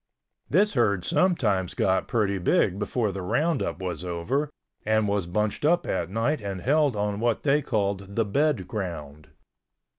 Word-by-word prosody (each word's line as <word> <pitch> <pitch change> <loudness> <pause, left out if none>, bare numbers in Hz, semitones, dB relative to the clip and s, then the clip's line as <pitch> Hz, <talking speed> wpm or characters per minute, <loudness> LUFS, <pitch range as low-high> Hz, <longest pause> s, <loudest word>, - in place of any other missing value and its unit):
This 205 +6 +3
herd 100 - +1
sometimes 110 - +1
got 95 -1 +1
pretty 100 -4 0
big 95 +2 +2
before 105 +1 -1
the 95 0 -5
roundup 155 - 0
was 90 -1 -4
over 90 - -2 0.3
and 110 0 +2
was 100 -3 -1
bunched 105 +7 -1
up 170 +4 +3
at 85 -2 -2
night 115 +8 0
and 100 -2 -4
held 145 - +2
on 105 0 -1
what 120 0 0
they 145 +1 +3
called 100 -6 -2
the 115 - +2
bed 135 - 0
ground. 75 -7 -6
105 Hz, 155 wpm, -26 LUFS, 95-135 Hz, 0.3 s, This